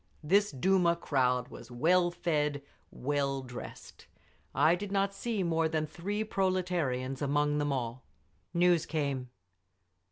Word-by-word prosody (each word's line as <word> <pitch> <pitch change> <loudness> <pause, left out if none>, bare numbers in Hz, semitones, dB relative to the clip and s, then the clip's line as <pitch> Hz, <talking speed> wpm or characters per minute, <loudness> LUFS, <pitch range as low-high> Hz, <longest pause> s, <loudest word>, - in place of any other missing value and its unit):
This 200 +6 +3
Duma 170 +4 +2
crowd 125 -6 0
was 120 - -11
well 175 +8 +3
fed, 150 -5 -1 0.3
well 140 0 -1
dressed; 125 -1 -10 0.5
I 160 - +5
did 195 +3 -3
not 195 0 +1
see 215 -1 -2
more 165 -2 +1
than 155 -1 0
three 200 +7 -3
proletarians 180 -11 -1
among 145 +1 +1
them 145 -1 0
all…. 125 -1 -3 0.5
News 175 -1 +3
came. 140 -5 -2
155 Hz, 125 wpm, -31 LUFS, 135-180 Hz, 0.5 s, I